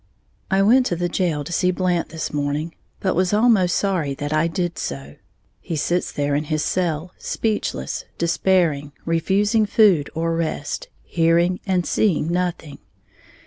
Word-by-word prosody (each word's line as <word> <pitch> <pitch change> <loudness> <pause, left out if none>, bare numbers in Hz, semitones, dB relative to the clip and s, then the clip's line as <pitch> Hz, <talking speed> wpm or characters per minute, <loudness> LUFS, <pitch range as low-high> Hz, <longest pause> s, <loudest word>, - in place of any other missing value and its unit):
_ - - -40 0.5
I 195 0 +3
went 250 +5 +5
to 175 - -1
the 175 +1 -1
jail 170 -4 -1
to 160 - -8
see 180 - +2
Blant 180 -2 0
this 160 -1 -5
morning, 145 +3 -2 0.3
but 190 - 0
was 185 +2 +1
almost 210 -6 +4
sorry 170 -9 0
that 145 +2 -4
I 155 +2 +2
did 175 +1 -3
so. 70 +1 -6 0.4
He 165 - -5
sits 175 +4 0
there 145 0 -1
in 150 +2 0
his 155 0 -1
cell, 175 0 -1
speechless, 210 - -2
despairing, 165 -4 +1
refusing 200 +6 +2
food 195 -9 +4
or 165 +1 0
rest, 160 -3 -3 0.2
hearing 170 +2 +2
and 180 -2 +1
seeing 170 -6 +1
nothing. 175 -5 -2
170 Hz, 155 wpm, -22 LUFS, 155-185 Hz, 0.5 s, went